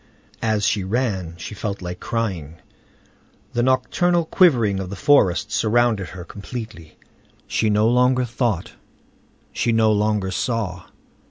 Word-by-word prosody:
As 110 -2 +1
she 100 - +1
ran 95 -5 -2
she 85 - -7
felt 100 -1 -4
like 90 0 -6
crying. 95 -10 -3 1.0
The 120 - +1
nocturnal 170 +7 +2
quivering 120 - +3
of 95 -1 -5
the 100 - -6
forest 105 -3 +3
surrounded 115 -3 +1
her 90 -1 -8
completely. 100 -5 -9 0.5
She 110 - 0
no 105 +1 +3
longer 125 +1 +3
thought, 115 -6 -2 0.8
she 120 - 0
no 110 -1 +3
longer 105 -2 0
saw. 95 -5 -2
110 Hz, 125 wpm, -22 LUFS, 95-120 Hz, 1.0 s, quivering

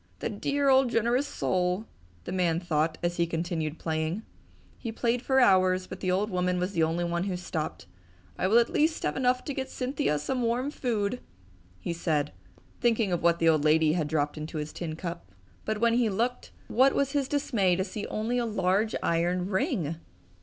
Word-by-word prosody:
"The - - -3
dear 280 +7 0
old 265 -1 +5
generous 240 +4 +1
soul!" 180 +3 0 0.4
the - - -6
old 185 - -2
man 170 -2 +2
thought 160 -2 0
as 175 0 0
he 170 -1 +2
continued 165 -2 -2
playing. 160 +5 -2 0.6
He 230 - -4
played 235 +1 0
for 265 +1 +2
hours, 185 -5 +4
but - - -8
the 185 - -2
old 200 +4 +1
woman 180 0 0
was 180 +2 -1
the 165 - +1
only 165 +2 +1
one 170 +1 -1
who 185 -3 -2
stopped. 160 - -4 0.5
"I 185 - 0
will 220 +4 +5
at 235 0 +3
least 315 +1 +1
have - - 0
enough 255 -1 +1
to 285 - -3
get 265 -1 -4
Cynthia 255 - -1
some 250 - -2
warm 245 +4 0
food!" 235 -4 -1 0.6
he 130 - -3
said, 155 -3 0 0.5
thinking 230 -4 +2
of 175 - 0
what 170 0 +3
the 165 - +2
old 155 -2 +3
lady 155 0 +4
had 160 -3 0
dropped 150 0 -1
into 155 +1 -5
his 150 0 -4
tin 160 -3 -4
cup. 170 - -6 0.3
But 215 -1 -1
when 235 0 +3
he 235 -2 +3
looked, 235 +5 -1 0.2
what 265 +3 +4
was 275 -1 +1
his 280 -2 0
dismay 235 -11 +1
to 190 - 0
see 205 +2 -5
only 230 +3 -1
a 240 - 0
large 205 +1 +1
iron 180 +3 0
ring! 190 - 0
185 Hz, 200 wpm, -28 LUFS, 170-240 Hz, 0.6 s, old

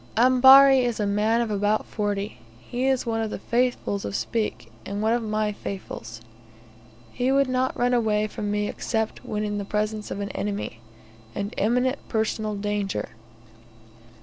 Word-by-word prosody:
Ambari 265 +2 +7
is 240 -2 -1
a 210 - +1
man 210 +3 +2
of 230 -2 -2
about 205 +1 +1
forty. 205 - -3 0.2
He 245 - -3
is 265 -2 +1
one 225 -1 -1
of 220 - -2
the - - -4
"Faithfuls" 240 -4 -1
of - - -4
Speke, 210 - -2
and 200 - -5
one 220 +2 +2
of 240 - +1
my 215 -1 -1
Faithfuls. 115 - -7 0.9
He 250 +2 0
would 275 0 +3
not 255 0 0
run 245 +1 +2
away 215 -3 +2
from 210 0 -4
me 210 0 0
except 220 0 -3
when 210 0 -3
in 205 -1 -2
the - - -3
presence 210 +1 -2
of - - -4
an 200 0 -3
enemy, 200 - -4 0.6
and 200 +1 -3
imminent 250 +6 +1
personal 220 -1 -1
danger. 205 -1 -2
215 Hz, 165 wpm, -25 LUFS, 205-245 Hz, 0.9 s, Ambari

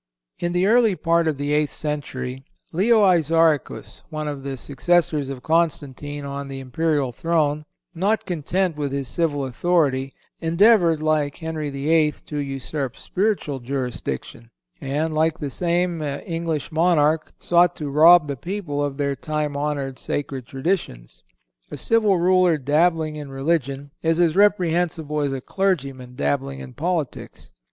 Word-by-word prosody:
In 175 0 -1
the 180 +1 +2
early 225 -1 +4
part 170 -1 +1
of 155 -3 0
the 145 +1 -1
eighth 150 -1 +2
century 135 -4 -4 0.3
Leo 210 +5 +4
Isauricus, 165 -4 +2
one 155 -1 -4
of 145 -2 -4
the 135 -1 -5
successors 150 +1 +1
of 135 -2 -7
Constantine 145 -3 -1
on 140 0 -5
the 135 -1 -6
imperial 140 0 0
throne, 150 +1 0 0.3
not 200 +6 0
content 175 +1 -1
with 145 -2 -2
his 140 -1 -3
civil 145 -1 -1
authority, 135 -1 0 0.2
endeavored, 170 -1 +4
like 150 -2 +1
Henry 160 -2 -4
VIII., 150 +2 +2
to 150 - -5
usurp 135 -1 -4
spiritual 190 -9 -1
jurisdiction, 120 - -5 0.3
and, 150 +4 -1
like 160 +1 +1
the 145 -4 -4
same 175 +1 0
English 160 +2 -3
monarch, 160 -1 +2
sought 175 0 +3
to 150 - -5
rob 160 +3 +7
the 140 - -3
people 160 - -3
of 140 -1 -3
their 140 -1 0
time 150 +1 -3
honored 140 -2 -2
sacred 135 -4 -4
traditions. 135 - -3 0.5
A - - -7
civil 215 -4 +2
ruler 180 -1 +4
dabbling 155 +2 +1
in 145 -2 -7
religion 140 0 -2
is 165 0 +1
as 170 -3 +3
reprehensible 175 -6 +2
as 140 -1 0
a 135 -1 -4
clergyman 135 -10 -2
dabbling 135 +1 -1
in 135 -2 -9
politics. 165 +1 -4
150 Hz, 145 wpm, -22 LUFS, 140-170 Hz, 0.5 s, rob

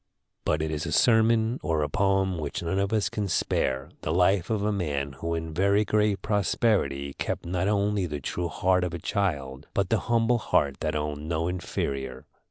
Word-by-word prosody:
But 75 0 +1
it 80 - -2
is 75 0 -3
a - - -3
sermon 115 0 +3
or 80 -1 0
a - - 0
poem 95 -2 +1
which 75 +2 -4
none 85 +3 0
of 100 0 0
us 110 -2 +2
can 105 -1 -2
spare, 65 -6 0
the 75 - -2
life 90 +1 +3
of 110 -3 0
a 105 - +1
man 75 -8 -2
who 85 0 -2
in 80 -1 -4
very 100 +4 +3
great 105 -1 +1
prosperity 100 -9 +1
kept - - -2
not 90 +2 -1
only 100 -2 +1
the 75 -2 -4
true 85 +6 -3
heart 90 +2 +1
of 90 -2 -2
a - - -2
child, 75 -8 -2
but 100 -2 +1
the 110 - +3
humble 120 +1 +3
heart 70 -9 +1
that - - -2
owned 75 0 -3
no 85 0 0
inferior. 70 -7 -3
90 Hz, 195 wpm, -27 LUFS, 75-100 Hz, -, sermon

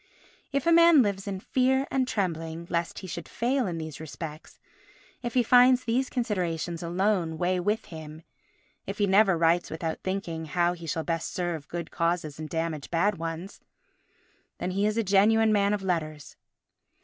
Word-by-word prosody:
If 280 -1 -1
a 335 - +4
man 335 -4 +7
lives 200 -1 -2
in 195 -2 -3
fear 265 +5 +1
and 260 -1 +1
trembling 165 -6 -3
lest 170 -1 -1
he 190 - -7
should 170 -1 -6
fail 250 0 0
in 170 -2 -3
these 155 -3 -6
respects, 155 0 -8 0.6
if 240 -1 -5
he 250 - +4
finds 250 +2 +6
these 250 +3 0
considerations 175 - -2
alone 175 -1 0
weigh 180 +2 0
with 205 +5 -1
him, 160 -1 -10 0.6
if - - -4
he 205 - +2
never 195 -1 +4
writes 165 +1 +2
without 160 0 -4
thinking 180 -4 -3
how 175 +2 +1
he 170 -2 -9
shall 160 +1 -2
best 165 -1 -2
serve 175 -6 -3
good 170 -1 -6
causes 165 -3 -1
and 155 -1 -6
damage 160 -3 -3
bad 175 +3 +1
ones, 165 +4 -6 1.0
then 185 - -3
he 200 +3 +1
is 215 +1 -1
a 230 - +2
genuine 215 +3 +4
man 200 -1 +3
of 205 -2 -1
letters. 155 -5 -3
180 Hz, 175 wpm, -27 LUFS, 165-215 Hz, 1.0 s, man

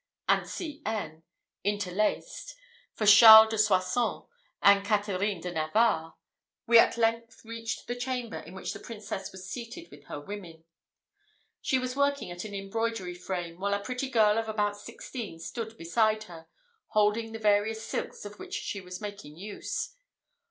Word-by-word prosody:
and - - +2
C. 305 -3 -6
N. 165 -8 -4 0.4
interlaced, 205 - -1 0.4
for 215 - -1
Charles 220 +1 +10
de 220 - -1
Soissons 210 +2 +1 0.4
and 200 0 +6
Catherine 205 -2 0
de 180 - -4
Navarre, 160 +1 +1 0.5
we 235 -1 +7
at - - +4
length 230 0 -1
reached 230 0 -5
the 245 - -3
chamber 245 -2 -3
in 170 +4 -12
which 190 - -4
the - - -8
Princess 205 -4 -6
was 190 0 -10
seated 245 - -7
with - - -15
her - - -6
women. 170 -1 -9 1.0
She 260 - +1
was 255 0 -3
working 280 -7 0
at 175 +3 -6
an 205 -1 -7
embroidery 195 -1 -3
frame, 175 -1 -5
while 200 +1 0
a - - -2
pretty 255 +4 -3
girl 220 -3 +4
of 225 -1 -4
about 210 -1 0
sixteen 230 -2 -8
stood 220 +6 -6
beside 215 +5 +1
her, 165 -5 -12 0.4
holding 215 +2 +1
the 225 - -5
various 220 +1 +1
silks - - -4
of 205 0 -9
which - - -6
she 200 - -4
was 180 +1 -9
making 205 -8 -8
use. 205 - -5
210 Hz, 160 wpm, -29 LUFS, 190-230 Hz, 1.0 s, Charles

